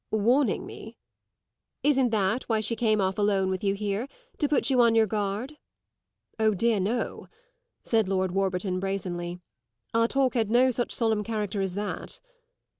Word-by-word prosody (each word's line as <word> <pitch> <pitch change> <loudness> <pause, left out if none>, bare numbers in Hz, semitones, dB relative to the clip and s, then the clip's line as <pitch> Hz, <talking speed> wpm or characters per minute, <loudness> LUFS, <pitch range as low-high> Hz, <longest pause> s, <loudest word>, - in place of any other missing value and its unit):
"Warning 240 +6 +2
me?" - - -10 0.9
"Isn't 270 -4 +3
that 215 +2 0
why 220 -1 +2
she 215 +2 -1
came 215 -2 +2
off 190 +1 0
alone 195 -2 +2
with 185 +1 -3
you 200 -1 +1
here 205 +4 -2 0.3
to 295 - +1
put 285 -1 +2
you 255 -2 +4
on 230 -1 +4
your 225 -1 +5
guard?" 210 +7 -3 0.8
"Oh 220 -1 +3
dear, 225 +2 +2
no," 215 +6 -2 0.6
said 220 -4 +1
Lord 190 -1 0
Warburton 185 -1 -1
brazenly; 180 -2 -3 0.5
"our 230 0 +3
talk 270 0 +1
had 225 -4 0
no 250 +3 +4
such 240 0 -1
solemn 220 -3 +1
character 210 -2 -2
as 190 -2 -2
that." 205 0 -5
215 Hz, 160 wpm, -27 LUFS, 195-235 Hz, 0.9 s, your